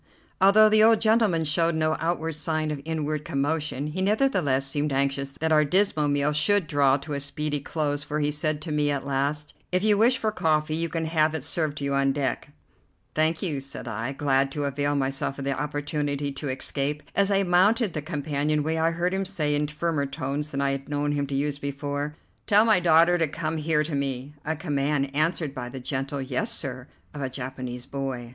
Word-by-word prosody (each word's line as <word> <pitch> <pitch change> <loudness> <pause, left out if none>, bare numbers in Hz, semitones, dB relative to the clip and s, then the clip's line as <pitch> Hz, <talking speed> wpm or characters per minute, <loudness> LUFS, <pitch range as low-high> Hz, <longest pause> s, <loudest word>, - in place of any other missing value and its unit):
Although 210 +3 +7
the 215 0 +5
old 225 0 +6
gentleman 215 -7 +3
showed 165 +2 +2
no 155 0 +1
outward 165 -1 -1
sign 155 0 -2
of 145 -2 -4
inward 155 -2 -2
commotion, 145 0 -1
he 155 +5 -3
nevertheless 190 - +2
seemed 145 +2 -1
anxious 135 0 -1
that 160 +2 -2
our 155 -1 +5
dismal 155 -1 +2
meal 145 +1 +1
should 200 +5 +3
draw 140 -2 +3
to 145 +2 -7
a 140 - -1
speedy 145 +1 -2
close, 145 0 -2
for 150 +1 -3
he 150 0 +1
said 150 0 -1
to 160 - -5
me 150 -1 +1
at 140 -1 -2
last: 140 +2 0 0.2
"If 185 +1 +1
you 210 -1 +4
wish 245 +4 +4
for 220 -3 -1
coffee, 155 -5 +1
you 165 +1 -1
can 165 -1 -2
have 160 -1 +2
it 155 - -3
served 155 -1 0
to 145 - -5
you 140 0 -1
on 135 0 +2
deck." 140 0 -2 0.6
"Thank 155 +3 +1
you," 150 -7 -1
said 135 -2 -8
I, 115 +3 -3
glad 135 -1 +1
to 145 - -2
avail 145 +1 -1
myself 135 0 -2
of 135 - -5
the 140 - 0
opportunity 145 0 -2
to 140 +1 -5
escape. 140 +3 -1
As 200 0 +3
I 195 -1 +3
mounted 195 +3 +3
the 155 - -3
companion 150 -1 -1
way 160 +1 -1
I 165 +1 +3
heard 170 +2 -1
him 195 0 0
say 170 -6 -1
in 150 0 +1
firmer 150 -1 -1
tones 140 +1 -3
than 140 -2 -3
I 140 0 +1
had 135 +1 -5
known 145 0 0
him 145 -1 -1
to 135 - -3
use 140 +1 -1
before: 145 +1 -4 0.3
"Tell 210 +2 +5
my 220 -5 +5
daughter 170 +1 +5
to 165 - +2
come 155 +2 -3
here 150 0 +1
to 155 0 -5
me," 140 0 -3
a 160 +1 -1
command 140 -3 -1
answered 155 -1 0
by 125 -3 -5
the 130 - -7
gentle 135 +2 -3
"Yes, 130 -1 -2
sir," 130 -2 -4 0.3
of 150 - -7
the 135 - -2
Japanese 125 -1 -6
boy. 135 -3 -4
150 Hz, 210 wpm, -26 LUFS, 140-160 Hz, 0.6 s, Although